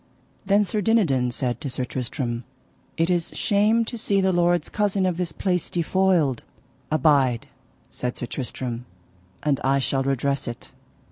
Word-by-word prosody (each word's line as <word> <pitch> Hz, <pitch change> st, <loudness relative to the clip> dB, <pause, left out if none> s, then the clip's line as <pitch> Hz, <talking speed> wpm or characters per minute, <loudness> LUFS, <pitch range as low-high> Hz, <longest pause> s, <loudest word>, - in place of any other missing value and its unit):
Then 205 Hz, +1 st, +4 dB
Sir 210 Hz, +3 st, -1 dB
Dinadan 170 Hz, -, +2 dB
said 120 Hz, 0 st, -2 dB
to 145 Hz, -, -3 dB
Sir 125 Hz, 0 st, -2 dB
Tristram: 125 Hz, -1 st, -3 dB, 0.5 s
It 165 Hz, +2 st, +2 dB
is 175 Hz, -2 st, -1 dB
shame 215 Hz, +3 st, +3 dB
to 235 Hz, +1 st, -5 dB
see 200 Hz, -2 st, +2 dB
the 190 Hz, 0 st, +3 dB
lord's 175 Hz, 0 st, +2 dB
cousin 205 Hz, -2 st, 0 dB
of 180 Hz, -2 st, 0 dB
this 175 Hz, -3 st, -2 dB
place 180 Hz, 0 st, -1 dB
defoiled. 170 Hz, -6 st, +2 dB, 0.5 s
Abide, 140 Hz, -5 st, +3 dB, 0.5 s
said 125 Hz, 0 st, -4 dB
Sir -, -, -3 dB
Tristram, 125 Hz, -1 st, -5 dB, 0.6 s
and 145 Hz, -3 st, +1 dB
I 135 Hz, +1 st, +3 dB
shall 135 Hz, 0 st, +1 dB
redress 135 Hz, 0 st, 0 dB
it. 120 Hz, -1 st, -7 dB
155 Hz, 150 wpm, -24 LUFS, 130-190 Hz, 0.6 s, Then